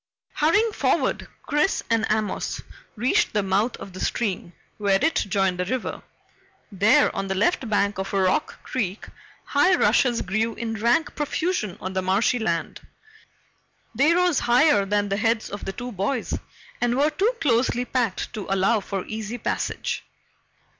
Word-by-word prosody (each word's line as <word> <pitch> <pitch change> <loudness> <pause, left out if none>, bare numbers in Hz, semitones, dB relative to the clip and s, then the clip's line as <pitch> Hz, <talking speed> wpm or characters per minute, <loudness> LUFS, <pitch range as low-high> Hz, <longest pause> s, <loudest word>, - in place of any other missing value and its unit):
Hurrying 415 +9 +3
forward, - - 0 0.2
Chris 300 +6 +1
and 225 -1 +1
Amos 215 -1 -1 0.3
reached 240 +3 +1
the 210 -2 +1
mouth 200 +5 0
of 195 - -10
the 185 - -8
stream 190 -6 -2 0.3
where 200 -2 +3
it 320 +7 +2
joined 195 -2 0
the 180 - 0
river. 250 +5 -3 0.7
There 220 +9 +3
on 195 0 -2
the 190 - -2
left 230 - +1
bank 205 -1 +1
of 190 - -3
Rock 190 -2 0
Creek, 210 -6 -3 0.4
high 325 +6 +3
rushes 245 -8 +2
grew 215 +4 -1
in 225 -1 -4
rank 235 +8 +1
profusion 295 - -2
on 185 +1 -5
the 190 - 0
marshy 195 +7 +2
land. 170 -7 -2 1.1
They 290 +8 +3
rose 360 -4 +3
higher 240 -4 +4
than 205 0 0
the 200 - 0
heads 225 +1 0
of 205 - -6
the 195 - -2
two 245 +3 -6
boys 215 +5 -2 0.5
and 245 +1 +1
were 295 +3 +3
too 415 +10 +1
closely 245 -2 +1
packed 245 -7 -1
to 215 -4 -6
allow 195 +4 +2
for 195 -2 -4
easy 220 +2 -5
passage. 225 - -3
220 Hz, 155 wpm, -24 LUFS, 195-255 Hz, 1.1 s, higher